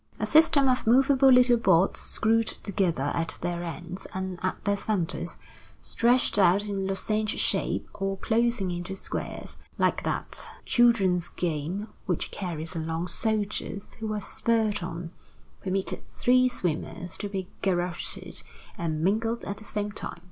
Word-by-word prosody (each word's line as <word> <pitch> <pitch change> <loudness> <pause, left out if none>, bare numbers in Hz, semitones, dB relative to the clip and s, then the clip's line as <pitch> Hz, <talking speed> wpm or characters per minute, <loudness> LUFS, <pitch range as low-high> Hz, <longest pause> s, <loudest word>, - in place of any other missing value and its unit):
A - - 0
system 315 -3 +5
of 255 -3 +1
movable 265 +2 +6
little 250 -1 +6
boards 190 -4 +3
screwed 225 +1 +1
together 175 -8 -1
at 165 -1 -1
their 175 0 -2
ends 175 +2 -6
and 190 -1 -4
at 185 - -3
their 200 -1 +2
centers, 200 -4 -2 0.4
stretched 240 -2 +2
out 195 +2 +5
in 195 -2 -2
lozenge 215 +2 -1
shape - - +1
or 195 0 -2
closing 230 -3 +1
into 175 +2 -4
squares, - - -5 0.2
like - - +2
that - - -3 0.2
children's 195 -8 +3
game 175 +5 -2 0.2
which 180 -4 -1
carries 170 -2 -4
along 165 +2 -2
soldiers 215 -2 -2
who 220 -1 -3
are 210 -1 -2
spurred 220 -1 0
on, 170 -1 -5 0.5
permitted 190 0 -2
three 255 +1 +3
swimmers 180 -5 -3
to 205 - -3
be 190 -2 -4
garroted 175 -2 -1 0.4
and 160 -2 -1
mangled 225 +5 0
at 200 - -4
the - - -12
same 210 -1 -3
time. 200 - -6
195 Hz, 140 wpm, -27 LUFS, 175-225 Hz, 0.5 s, movable